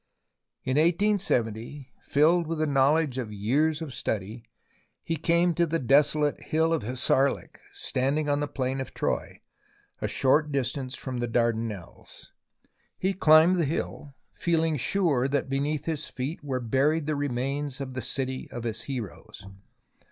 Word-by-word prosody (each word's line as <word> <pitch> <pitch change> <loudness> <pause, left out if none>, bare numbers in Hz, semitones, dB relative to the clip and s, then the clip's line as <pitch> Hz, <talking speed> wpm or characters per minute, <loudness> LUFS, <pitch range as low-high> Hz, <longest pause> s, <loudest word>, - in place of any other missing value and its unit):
In 130 +2 0
1870, 145 - 0
filled 165 +4 +3
with 165 0 -2
the 155 - +1
knowledge 140 0 +2
of 115 -4 -4
years 145 +10 +1
of 145 -5 -7
study, 110 -1 -3 0.6
he 165 - -2
came 170 +2 +2
to 170 0 +1
the 165 +1 0
desolate 145 +2 +2
Hill 160 +1 +1
of 165 - 0
Hissarlik 130 +4 0
standing 140 +4 -1
on 145 0 +1
the 145 - -1
Plain 135 -1 -2
of 130 - -8
Troy, - - -2 0.6
a - - 0
short 150 +3 +2
distance 130 -1 -2
from 130 -2 -5
the 120 - -1
Dardanelles. 115 -5 -3 0.7
He 190 +1 0
climbed 160 +1 +6
the 170 - +2
hill, 145 -1 -4 0.2
feeling 165 -2 +1
sure 145 -3 +1
that 140 -1 -1
beneath 145 +2 -1
his 155 -2 -2
feet 140 +5 -5
were 135 -3 -2
buried 140 +6 +1
the 155 0 -1
remains 140 +1 -2
of 135 -2 -5
the 130 - -3
city 130 0 -3
of 120 - -6
his 110 -2 -2
heroes. 110 -6 -7
140 Hz, 150 wpm, -27 LUFS, 125-155 Hz, 0.7 s, climbed